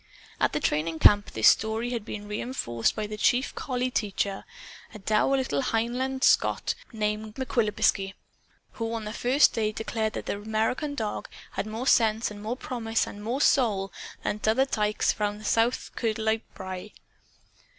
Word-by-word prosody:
At - - +2
the - - +1
training 160 +2 0
camp 205 +4 +6
this 110 - +5
story 220 +3 +1
had 235 -3 -2
been 205 0 -7
reenforced 210 - -1
by 215 - -2
the 210 0 -6
chief 250 +4 +2
collie 255 -2 -2
teacher 200 -3 -1 0.5
a - - -5
dour 215 +6 +2
little 145 - 0
Hieland 250 - -1
Scot - - +3 0.2
named 215 -1 -2
McQuibigaskie, 210 -6 +1 0.6
who 225 -1 -4
on 225 -2 -4
the 210 - -5
first 255 +5 +4
day 215 -2 0
declared 220 0 -2
that - - -5
the - - -2
American 225 +7 -1
dog 220 -5 -3 0.2
had - - -3
more 220 +4 -4
sense 225 -3 +3
and 205 0 -9
more 225 +4 -3
promise 225 -4 -1
and 205 +1 -9
more 245 +6 -1
soul 205 -10 +2 0.3
"than 210 - -1
a' - - -15
t'other 225 +5 +3
tykes 210 -5 +1 0.3
south 230 +3 +1
o' - - -6
Kirkcudbright 220 -1 0
Brae." 190 +2 -7
220 Hz, 160 wpm, -27 LUFS, 210-240 Hz, 0.6 s, camp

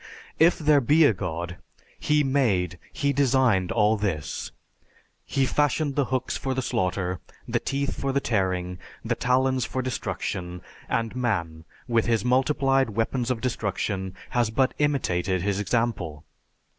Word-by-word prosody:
If 165 +2 +5
there 150 -2 +4
be 150 +6 +5
a 120 - +5
God, 85 -1 -4 0.4
he 150 0 +2
made, 100 - +1
he 140 0 0
designed 130 -9 +3
all 110 0 +3
this. 90 -9 -3 0.8
He 135 -1 +1
fashioned 145 +1 +1
the 145 - +2
hooks 130 0 -2
for 135 -1 -2
the 130 - -1
slaughter, 90 -3 -1 0.3
the - - 0
teeth 140 0 -2
for 140 - 0
the 140 - +2
tearing, 90 -6 -1 0.3
the - - +1
talons 130 0 +1
for 130 - -3
destruction, 90 -7 -4 0.3
and 115 0 -1
man 85 -10 -2 0.2
with 115 -2 +2
his 115 -2 +1
multiplied 135 0 +2
weapons 115 +3 -1
of 120 -3 -1
destruction 100 -5 -2 0.2
has 120 -3 +2
but 130 +4 +1
imitated 95 - 0
his 100 0 0
example. 100 -8 -1
115 Hz, 145 wpm, -25 LUFS, 95-135 Hz, 0.8 s, If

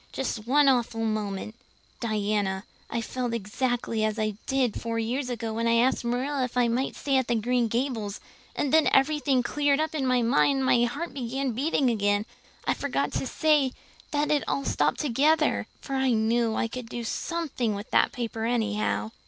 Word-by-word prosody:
Just 235 -4 -3
one 285 +2 +4
awful 235 -3 +2
moment 215 -1 -2 0.5
Diana, 205 -3 -1 0.3
I 235 - -2
felt 245 0 -3
exactly 230 +1 -1
as 215 0 0
I 215 -1 0
did 260 -4 0
four 230 0 -2
years 250 +4 -1
ago 230 -2 -3
when 230 +1 -1
I 230 - +4
asked 245 +3 +2
Marilla 255 +3 -1
if 250 0 -4
I 245 -1 +4
might 245 +3 -1
stay 275 -2 0
at 260 - +1 0.2
Green 245 0 +2
Gables 230 -3 -2 0.4
and 285 - -1
then 315 -1 +5
everything 275 -2 +3
cleared 285 +2 +1
up 315 0 -1
in 280 -4 -1
my 250 -1 +3
mind 275 +3 +3
and 265 - 0
my 240 -2 +4
heart 290 +8 -4
began 265 +1 -2
beating 265 +1 +1
again 205 -1 +1 0.4
I - - +2
forgot - - -1
to - - -2
say 300 -5 +2 0.4
that 295 0 0
it 295 -1 +2
had 275 - -1
stopped - - +1
altogether! 300 +3 +2
for 275 - -6
I 265 -2 +2
knew 225 +1 +1
I - - 0
could 235 0 -7
do 240 -1 -5
something 255 -5 -2
with 205 +2 -8
that - - +4
paper 225 -2 -4
anyhow. 220 -2 0
245 Hz, 185 wpm, -27 LUFS, 225-270 Hz, 0.5 s, then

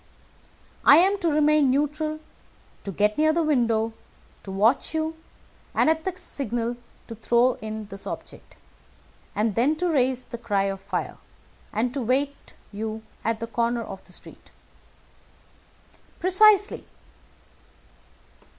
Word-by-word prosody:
"I 285 - +9
am 390 +4 +4
to 345 -3 +1
remain 300 -2 +4
neutral, 300 +3 0 0.7
to 200 - -3
get 210 - +1
near 310 0 +4
the 335 +1 +1
window, 230 -7 +1 0.5
to - - -11
watch 215 +11 +2
you, 315 0 -1 0.6
and, 315 - +4
at 320 0 -2
the 375 -1 -3
signal, 240 - -3 0.3
to 230 - -7
throw 235 +3 +2
in 220 0 -5
this 195 -1 -8
object, - - -8 0.8
then 230 +7 +2
to 350 +2 -1
raise 255 -3 +1
the 235 - -8
cry 205 -4 0
of 195 -1 -3
fire - - -4 0.5
and 240 +4 -1
to 275 - -2
wait 270 +4 -1 0.2
you 220 +1 -5 0.2
at 225 0 -1
the 230 - -3
corner 235 0 -1
of 190 - -9
the - - -17
street." - - -12 1.7
"Precisely." 410 +3 +4
250 Hz, 130 wpm, -25 LUFS, 220-310 Hz, 1.7 s, I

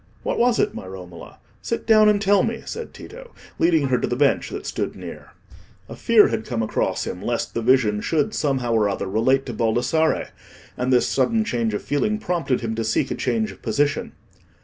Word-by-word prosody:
"What - - -2
was 240 -1 +3
it, - - +1
my - - -8
Romola? 90 -2 -10 0.2
Sit 230 - -3
down 215 -1 +6
and 210 -1 +3
tell 200 -1 +3
me," 225 +2 -2
said 465 0 -6
Tito, - - -12 0.2
leading 160 -5 +3
her 125 - +2
to - - -1
the 120 - -1
bench 140 +1 +2
that 405 +1 -7
stood - - -3
near. - - -10 0.5
A - - -9
fear 230 -2 +5
had 115 -1 -2
come 115 -2 -2
across 110 - -1
him 90 - -5
lest 120 +2 -2
the 115 - -2
vision 115 -4 +3
should 155 -3 0
somehow 130 -5 0
or 105 -2 +2
other 100 - -3
relate 115 +7 +1
to 125 - -5
Baldassarre; 120 +8 +1 0.5
and 125 +1 -1
this 125 -1 +4
sudden 225 -1 +1
change 115 - -1
of - - -4
feeling 210 +9 0
prompted 175 - -1
him 115 -1 -3
to 115 0 -2
seek 110 0 0
a - - +1
change 220 -1 -1
of - - -15
position. 145 +1 -1
135 Hz, 205 wpm, -22 LUFS, -, 0.5 s, down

